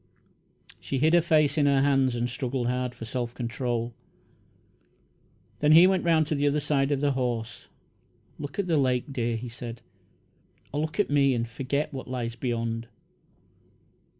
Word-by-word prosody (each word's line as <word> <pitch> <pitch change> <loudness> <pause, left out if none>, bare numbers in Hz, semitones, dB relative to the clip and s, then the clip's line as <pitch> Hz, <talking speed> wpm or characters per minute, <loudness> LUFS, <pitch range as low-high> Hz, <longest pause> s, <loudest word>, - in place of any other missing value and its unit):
She 135 - -3
hid 155 +5 +3
her 175 - +6
face 155 -2 +2
in 145 - +3
her 140 -1 +3
hands 135 -3 +2
and 120 0 -1
struggled 125 0 -3
hard 125 0 -2
for 115 - -8
self 120 0 -4
control. 120 0 -3 1.7
Then 150 +1 +4
he 170 +3 +9
went 190 0 +2
around 160 -2 +3
to 155 - -2
the 145 0 +1
other 145 +1 +2
side 145 -1 0
of 140 -1 0
the 145 -1 +2
horse. 120 -4 -3 0.7
"Look 145 -1 -7
at 200 - 0
the 165 -3 +1
lake, 130 0 0
dear," 120 -3 -1
he 120 +2 -6
said; 120 -1 -8 0.9
"or 145 - -1
look 155 +5 -4
at 205 - +1
me 140 -2 +3
and 115 0 -1
forget 135 +6 -3
what 130 - -6
lies 120 -2 -3
beyond." 115 -1 -3
135 Hz, 170 wpm, -27 LUFS, 120-145 Hz, 1.7 s, he